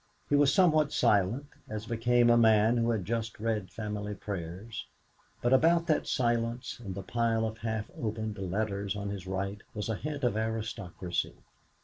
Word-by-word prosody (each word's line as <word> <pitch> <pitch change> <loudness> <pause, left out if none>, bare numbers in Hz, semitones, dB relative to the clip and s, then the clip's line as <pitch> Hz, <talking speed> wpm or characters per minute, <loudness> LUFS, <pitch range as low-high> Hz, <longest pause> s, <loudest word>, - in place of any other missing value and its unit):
He - - +5
was 145 -1 +5
somewhat 155 -5 +4
silent, 105 +7 +2 0.2
as 110 0 -4
became 120 +1 +3
a - - +6
man 110 0 +5
who 115 0 +2
has 110 -5 0
just 115 +2 -3
read 110 -3 -1
family 105 -1 -4
prayers; 95 +3 -6 0.6
but 120 +2 +3
about 165 +5 +5
that 155 -3 +1
silence, 120 0 0
and 95 -4 -5
the 100 - -5
pile 115 0 +1
of 110 +1 -4
half 110 -2 -3
opened 110 -1 -3
letters 100 +1 -2
on 100 0 -3
his 100 -2 -6
right, 100 +2 -3
was 105 +1 -3
a 110 - 0
hint 145 +3 -5
of 120 -4 +2
autocracy. 110 -5 -2
110 Hz, 165 wpm, -30 LUFS, 100-120 Hz, 0.6 s, a